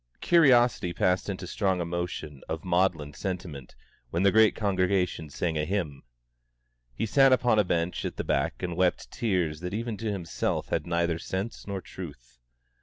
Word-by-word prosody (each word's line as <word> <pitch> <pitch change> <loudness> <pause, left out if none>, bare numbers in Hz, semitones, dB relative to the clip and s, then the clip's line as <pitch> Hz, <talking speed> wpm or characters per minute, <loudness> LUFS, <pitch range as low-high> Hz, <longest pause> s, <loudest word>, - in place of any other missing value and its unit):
Curiosity 125 - +4
passed 90 +3 +1
into 95 -2 -4
strong 95 0 0
emotion 85 -4 -4
of 80 +1 -4
maudlin 85 -5 +1
sentiment 85 -6 -6 0.3
when 85 +7 0
the 100 - +5
great 110 +1 +5
congregation 95 -5 0
sang 80 +2 -2
a - - +1
hymn. 80 -5 -2 0.9
He - - -1
sat 135 +4 +5
upon 125 -4 +4
a - - +5
bench 85 -1 -1
at - - -4
the - - -2
back - - -1
and 90 -2 -2
wept 90 0 0
tears 90 - -1
that 90 +3 -4
even 115 -1 -3
to 110 0 -2
himself 90 -5 -2
had - - -1
neither 85 -1 0
sense 95 +7 -5
nor 100 -1 -3
truth. 65 -11 -10
90 Hz, 165 wpm, -28 LUFS, 85-100 Hz, 0.9 s, the